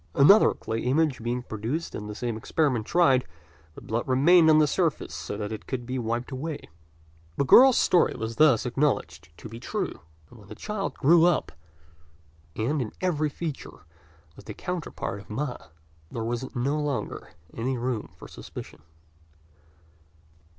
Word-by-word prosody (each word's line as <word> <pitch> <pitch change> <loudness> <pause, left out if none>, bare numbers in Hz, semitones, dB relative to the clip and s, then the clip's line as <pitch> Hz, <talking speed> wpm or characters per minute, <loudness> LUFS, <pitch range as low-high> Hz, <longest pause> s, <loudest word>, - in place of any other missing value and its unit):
Another 195 +10 +6
clay 110 0 -4
image 135 +1 +1
being 120 +2 -2
produced 120 +10 -4
and 105 0 -6
the 105 - -6
same 120 0 -3
experiment 120 0 0
tried, 135 -8 +4 0.5
the - - -11
blood 115 +2 -3
remained 160 +6 +5
on 155 - +6
the 155 - +5
surface 140 - -1
so - - -5
that 105 0 -4
it 110 - -7
could 125 -2 -4
be 130 +1 -3
wiped 120 +3 -3
away. 145 +3 -5 0.7
The 140 - +1
girl's 260 - +7
story 180 - +3
was 115 0 -5
thus 150 -7 +4
acknowledged 135 +4 -1
to - - -9
be 115 +1 -9
true; 125 - -4 0.3
and 120 - -15
when 100 - -16
the 110 - -10
child 210 - -4
grew 165 +4 +5
up, 175 -2 +1 1.0
and 135 +7 -1
in 110 - -5
every 155 -5 0
feature 150 - -7 0.5
was - - -14
the - - -8
counterpart 175 - -5
of 100 - -15
Ma, 125 +4 -3 0.5
there 115 - -4
was 120 +4 -4
no 140 +5 0
longer 145 -3 -4 0.2
any 125 +3 -2
room 120 -2 -3
for - - -11
suspicion. 75 - -10
130 Hz, 160 wpm, -26 LUFS, 115-155 Hz, 1.0 s, girl's